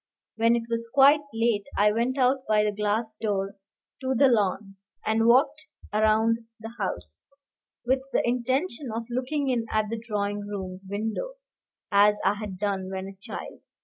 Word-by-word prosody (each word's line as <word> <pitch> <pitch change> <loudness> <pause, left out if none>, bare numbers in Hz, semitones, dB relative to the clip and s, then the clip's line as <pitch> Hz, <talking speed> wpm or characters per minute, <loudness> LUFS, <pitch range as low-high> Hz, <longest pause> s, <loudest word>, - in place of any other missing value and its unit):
When 230 +1 +3
it 235 - -1
was 230 0 -3
quite 280 +2 +7
late, 225 -3 0
I 210 +1 +5
went 235 +5 0
out 260 +1 +3
by 210 -1 +4
the 210 - +1
glass 210 +2 -1
door 200 -2 -1 0.5
to 260 0 0
the 270 +2 +5
lawn, 200 -3 0 0.3
and 225 +1 +2
walked 280 +6 +3 0.3
round 220 +2 +3 0.2
the 225 +1 -8
house, - - -4 0.7
with 260 +2 +2
the - - +1
intention 255 +3 -1
of 230 +1 -4
looking 265 +3 -1
in 235 -3 0
at 215 -1 0
the 230 -1 -3
drawing 205 -2 -2
room 190 -2 -6
windows, 220 - -3 0.6
as 210 +1 +5
I - - +4
had 205 -3 -6
done 195 -1 -2
when 190 0 -4
a 195 - -12
child. - - -8
225 Hz, 165 wpm, -26 LUFS, 205-250 Hz, 0.7 s, quite